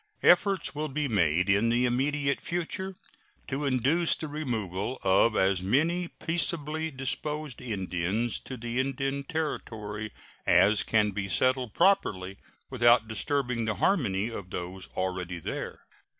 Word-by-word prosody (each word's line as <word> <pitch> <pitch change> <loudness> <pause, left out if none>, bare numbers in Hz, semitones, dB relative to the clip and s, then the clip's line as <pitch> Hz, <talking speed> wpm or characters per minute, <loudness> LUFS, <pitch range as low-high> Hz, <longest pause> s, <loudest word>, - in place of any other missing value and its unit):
Efforts 195 +2 +4
will 150 +1 -2
be 150 +1 -2
made 90 - +2
in 100 +3 +3
the 120 +2 +2
immediate 140 +3 0
future 185 +2 -3 0.5
to 145 +2 -2
induce 140 +6 +3
the 155 - -5
removal 120 - -3
of 100 +4 +4
as 95 -1 +2
many 160 - +1
peaceably 160 -2 -2
disposed 150 0 -4
Indians 100 0 -2
to 130 - -7
the 120 +1 -3
Indian 135 +1 -1
Territory 110 -9 -4 0.4
as 95 +4 +5
can 105 -2 +2
be 95 0 -3
settled 130 +4 +1
properly 100 - +2 0.3
without 120 -3 +4
disturbing 120 +1 -1
the 110 -1 -1
harmony 105 - +1
of 100 -5 -7
those 90 +1 -6
already 90 -1 -2
there. 85 - -6
120 Hz, 130 wpm, -28 LUFS, 100-150 Hz, 0.5 s, as